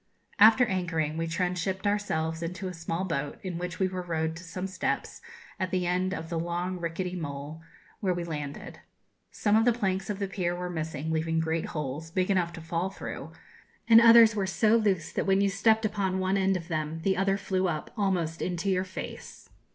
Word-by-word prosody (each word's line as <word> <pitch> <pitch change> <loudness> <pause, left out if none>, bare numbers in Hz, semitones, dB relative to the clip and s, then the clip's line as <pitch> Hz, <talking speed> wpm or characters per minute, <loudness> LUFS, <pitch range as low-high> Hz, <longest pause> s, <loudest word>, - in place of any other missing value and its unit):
After 220 +4 +8
anchoring, 170 -7 -1
we 165 +1 -2
transshipped 180 +3 -2
ourselves 165 -6 0
into 180 +3 -4
a 185 - -5
small 165 +2 -3
boat, 145 -5 -3
in 180 -3 -4
which 180 0 -4
we 190 - +2
were 185 0 -4
rowed 160 -2 -2
to 175 - -10
some 185 +2 -5
steps, 185 -1 -3 0.4
at 185 -1 -1
the 185 -1 0
end 180 +1 0
of 165 -3 -4
the 170 -2 -1
long 175 +2 -2
rickety 175 +2 -3
mole, 145 -1 -6 0.4
where 185 -4 0
we 175 - -3
landed. 150 -4 -6 0.5
Some 210 -1 +1
of 220 - +5
the 245 - +5
planks 195 -4 -1
of 205 - -2
the 200 -1 -2
pier 180 -2 -2
were 180 0 -4
missing, 160 -2 -3
leaving 160 0 0
great 160 0 -1
holes, 150 +1 -4
big 185 +3 0
enough 180 -3 +1
to 165 - -8
fall 165 +3 -2
through, 195 - -7 0.6
and 230 0 +9
others 230 -1 +8
were 195 -2 0
so 215 +4 +3
loose 200 -7 +1
that - - -2
when 195 0 +4
you 200 0 +2
stepped 220 +3 +3
upon 200 -3 0
one 185 +1 +1
end 195 -1 +2
of 165 -2 -9
them 155 -1 -3
the 190 0 +2
other 195 +1 +1
flew 190 -1 0
up 155 -3 -3
almost 180 -6 0
into 180 +2 -1
your 185 0 +1
face. 185 0 -8
180 Hz, 205 wpm, -28 LUFS, 165-195 Hz, 0.6 s, and